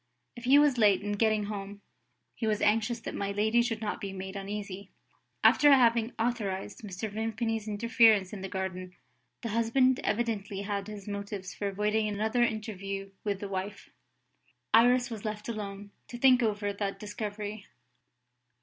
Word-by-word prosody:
If 240 0 -9
he 270 +3 +7
was 290 -4 +4
late 205 -3 +5
in 205 - -2
getting 215 0 +2
home, 200 -1 -6 0.5
he 220 - -3
was 210 -1 +1
anxious 225 +2 +2
that - - -6
my 200 0 -2
lady 220 +4 +2
should 225 -2 -2
not 210 -1 -3
be 200 - -4
made 190 0 -7
uneasy. 200 -1 -6 0.5
After 290 0 +6
having 235 -3 +4
authorised 210 -4 -2
Mr. 205 0 -5
Vimpany's 225 0 -2
interference 215 -2 +4
in 200 - -6
the 195 - -5
garden, 185 -1 -4 0.5
the 230 - -2
husband 235 +4 +2
evidently 210 -3 -1
had 200 -1 -3
his 210 -2 -8
motives 200 -2 -5
for 205 - -3
avoiding 210 +2 0
another 220 +4 0
interview 195 -4 -2
with 200 -2 -2
the 200 - -3
wife. 195 +1 -5 0.8
Iris 245 +2 +5
was 220 -3 -6
left 210 -1 -4
alone, 205 -3 -6 0.2
to 240 - -7
think 255 0 +5
over 205 -2 0
that 200 -1 -3
discovery. 210 -1 -5
210 Hz, 160 wpm, -29 LUFS, 200-225 Hz, 0.8 s, he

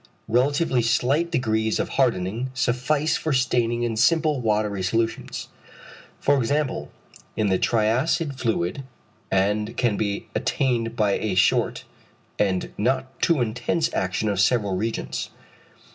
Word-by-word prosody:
Relatively 130 +3 +2
slight 130 +8 +1
degrees 110 -7 0
of - - -2
hardening 115 -1 0
suffice 125 +5 +1
for 160 - -2
staining 120 -3 +1
in 115 -2 -1
simple 150 +4 +2
watery 105 -3 0
solutions, 115 +5 -2 0.7
for 140 0 +3
example, 130 - -1 0.4
in 105 -2 +1
the 95 -1 +2
triacid 130 +8 +1
fluid, 115 -1 -1 0.5
and 105 +4 0
can 120 -5 +1
be 100 -2 -2
attained 120 -4 0
by 105 -3 +2
a 105 -4 -2
short, 95 +2 +2 0.6
and 95 -3 0
not 130 +4 -1
too 165 -6 +3
intense 125 +8 -1
action 95 +4 -1
of 100 -2 0
several 100 -2 +2
reagents. 110 +4 -3
115 Hz, 125 wpm, -24 LUFS, 105-130 Hz, 0.7 s, for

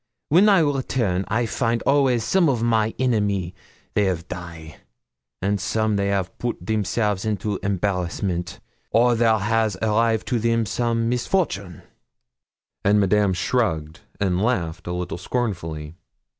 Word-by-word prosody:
Wen 190 +7 +6
I 195 -4 +5
return, 130 - 0
I 115 +3 0
find 115 0 -1
always 135 -4 +3
some 180 +4 +3
of 120 -4 0
my 110 -2 +1
enemy 100 -8 0 0.4
they 100 -2 +2
'av 90 -1 -3
die, 85 -3 -8 0.7
and 100 0 0
some 110 0 0
they 100 0 0
have 100 -2 -1
put 120 -1 -2
themselves 105 -1 0
into 105 -2 -2
embarrassment, 90 -2 -2 0.3
or 120 +1 +4
there 115 -1 +3
has 110 -1 0
arrived 110 +1 +1
to 120 - +1
them 115 0 +1
some 115 +1 0
misfortune;' 120 - -1 1.0
and 105 +1 +4
Madame 100 0 +3
shrugged 80 -8 -1 0.2
and 95 -2 +1
laughed 90 -8 -1
a - - -2
little 90 -1 -4
scornfully. 85 -9 -3
105 Hz, 135 wpm, -23 LUFS, 95-115 Hz, 1.0 s, Wen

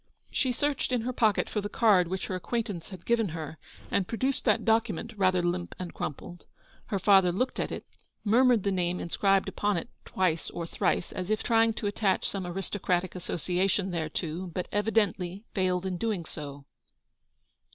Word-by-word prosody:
She 260 - +1
searched 285 +2 0
in 250 -2 +2
her 250 +3 -2
pocket 220 -4 +2
for 210 - -2
the 205 - -4
card 200 -7 +4
which 185 +2 -3
her 190 - -4
acquaintance 200 -1 -3
had 185 -4 -10
given 230 -4 +2
her, 155 0 -6 0.3
and 190 -2 +1
produced 260 +4 -1
that 215 -4 +3
document, 225 +1 +1
rather 185 -3 +3
limp 175 0 -1
and 180 -2 -6
crumpled. 170 +4 -6 0.4
Her 200 - -1
father 190 -2 +5
looked 255 +9 -1
at - - -1
it, - - -5 0.4
murmured 235 0 +4
the 200 - +1
name 180 -1 0
inscribed 195 +3 +2
upon 205 -2 0
it 165 - -4
twice 180 -4 0
or 170 - -4
thrice, 170 - 0
as 185 +1 -4
if 215 0 +1
trying 225 -1 +4
to 215 - -5
attach 205 -2 +1
some 190 -3 -3
aristocratic 185 0 -1
association 185 +2 0
thereto, 165 +1 -3
but 180 +1 -4
evi 210 +1 +1
dently 195 -3 0
failed 185 -1 +1
in 185 -2 -2
doing 210 -7 -1
so. 145 -3 -8
190 Hz, 175 wpm, -29 LUFS, 175-220 Hz, 0.4 s, father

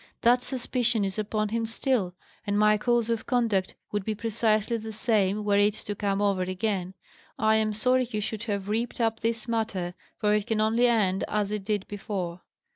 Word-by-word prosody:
That 245 +1 +5
suspicion 245 -4 0
is 195 +2 -2
upon 215 0 -1
him 225 +1 -1
still; 225 -6 0 0.3
and 205 0 +1
my 210 0 +5
course 240 0 +2
of 230 -1 -2
conduct 225 -7 +1 0.2
would 205 -1 -1
be 215 +2 -2
precisely 225 0 +1
the 220 0 -6
same, 210 -2 +1
were 200 -1 +3
it 205 +1 +3
to 210 - -5
come 200 0 -1
over 200 -2 +2
again. 185 0 -2 0.4
I 220 0 +3
am 215 0 +1
sorry 250 +4 +2
you 215 - -2
should 215 +2 -3
have 200 -3 -2
reaped 230 +4 -2
up 225 -1 +1
this 230 0 -1
matter, 215 -6 -1 0.2
for 210 -2 +2
it 210 -1 0
can 220 -1 0
only 225 +3 +3
end 205 -5 +2
as 210 -1 -1
it 210 -2 -3
did 205 -1 -2
before." 190 -4 -4
215 Hz, 195 wpm, -27 LUFS, 200-230 Hz, 0.4 s, That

